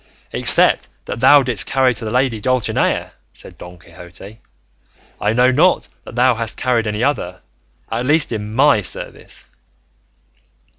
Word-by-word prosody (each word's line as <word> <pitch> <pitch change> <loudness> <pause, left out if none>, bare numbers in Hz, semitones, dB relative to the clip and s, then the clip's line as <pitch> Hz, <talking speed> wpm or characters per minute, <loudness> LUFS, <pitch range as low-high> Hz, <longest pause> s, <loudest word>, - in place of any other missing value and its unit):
"Except - - +5 0.2
that - - -6
thou 140 +3 +5
didst 120 -6 -1
carry 130 -2 +1
to 115 - -7
the 110 - -4
lady 125 -2 -1
Dulcinea," 130 0 -1 0.2
said - - -9
Don 90 0 -12
Quixote, 90 +5 -14 0.8
"I 105 +1 0
know 125 +2 +3
not 170 +8 +1 0.2
that - - -11
thou 125 +1 +3
hast 115 -1 -4
carried 120 -3 -1
any 105 +2 -3
other, 90 -11 -3 0.5
at 120 +3 -3
least 150 -1 +1
in 105 -2 -5
my 140 -4 +3
service." 90 - -3
120 Hz, 145 wpm, -17 LUFS, 105-130 Hz, 0.8 s, Except